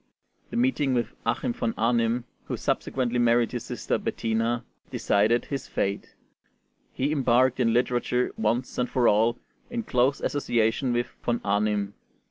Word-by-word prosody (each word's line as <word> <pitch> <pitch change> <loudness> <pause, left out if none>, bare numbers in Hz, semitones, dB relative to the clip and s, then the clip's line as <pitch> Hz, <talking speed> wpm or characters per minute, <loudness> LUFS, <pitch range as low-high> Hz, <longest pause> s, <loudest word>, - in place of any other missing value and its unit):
The - - -4
meeting 155 - +2
with 120 -1 -1
Achim 245 - 0
von 240 -2 -2
Arnim, 115 0 +1 0.2
who - - -3
subsequently 125 -2 -1
married 120 0 +3
his 120 -2 -4
sister - - -2
Bettina, 115 +1 -1 0.2
decided 110 +4 +2
his 140 -2 -4
fate: 100 0 -2 0.8
he 140 +3 -1
embarked 130 -3 +3
in 115 -2 +3
literature 125 +1 +1
once 115 +4 -1
and 125 - 0
for 125 -3 +2
all 115 +3 +3 0.3
in 240 -1 -3
close 130 - +2
association 120 -2 0
with 120 0 -1
Von 120 -1 0
Arnim. 100 0 0
120 Hz, 140 wpm, -26 LUFS, 115-130 Hz, 0.8 s, married